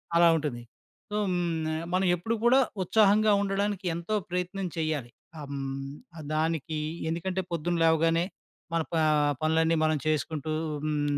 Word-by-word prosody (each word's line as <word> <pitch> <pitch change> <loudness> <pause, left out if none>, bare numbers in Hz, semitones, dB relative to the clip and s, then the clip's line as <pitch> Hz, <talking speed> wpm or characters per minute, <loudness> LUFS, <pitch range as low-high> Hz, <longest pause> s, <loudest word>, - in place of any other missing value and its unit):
అలా 170 0 +7
ఉంటుంది. 145 -6 -3 0.5
సో, - - -2
హ్మ్, 175 -1 0 0.2
న - - -1 0.2
మనం 185 +1 +2
ఎప్పుడు 220 +7 -2
కూడా 250 +3 +6 0.2
ఉత్సాహంగా 210 +2 +4
ఉండడానికి 200 0 -1
ఎంతో 170 +6 -2
ప్రయత్నం 180 +2 -2
చేయాలి. 155 -6 -1 0.3
ఆహ్, 145 - -7
హ్మ్, 135 0 -4 0.4
దానికి 160 0 -1 0.3
ఎందుకంటే 180 +3 -2
పొద్దున 170 +1 -1
లేవగానే 165 +1 +3 0.5
మన 165 - +2
ప - - +1 0.5
పనులన్నీ 160 +1 +3
మనం 155 0 +2
చేసుకుంటూ 155 0 -1 0.3
హ్మ్, 145 -1 0
165 Hz, 135 wpm, -28 LUFS, 155-185 Hz, 0.5 s, అలా